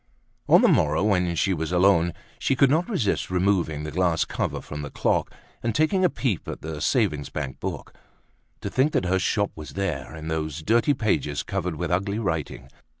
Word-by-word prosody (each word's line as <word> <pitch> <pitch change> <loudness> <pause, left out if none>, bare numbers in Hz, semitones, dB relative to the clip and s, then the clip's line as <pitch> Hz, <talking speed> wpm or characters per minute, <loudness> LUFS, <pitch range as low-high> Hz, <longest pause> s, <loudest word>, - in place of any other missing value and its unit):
On - - +7
the - - +7
morrow, 75 +6 +3
when 90 -5 +2
she 95 +3 +1
was 80 -1 -3
alone, 90 -2 +4 0.3
she 135 - +1
could 135 0 +4
not 165 +7 +1
resist 135 - 0
removing 90 -5 +1
the 75 - -5
glass 85 -2 +1
cover - - -2
from 75 0 -7
the 75 - -5
clock, - - 0 0.3
and 115 -2 -1
taking 170 - +2
a 180 - +5
peep 120 - -2
at - - -6
the 80 -1 -5
savings 80 - +1
bank 65 -1 -5
book. - - -5 0.7
To - - -3
think 135 +4 +2
that - - +1
her 95 +1 +2
shop 100 +2 0
was 75 -1 -9
there, 90 -6 -3
in 80 0 -7
those 80 -1 -3
dirty 120 - +3
pages, 95 - 0
covered 90 -1 -3
with 85 +2 -3
ugly 100 +3 0
writing! 80 - -3
90 Hz, 195 wpm, -25 LUFS, 80-105 Hz, 0.7 s, On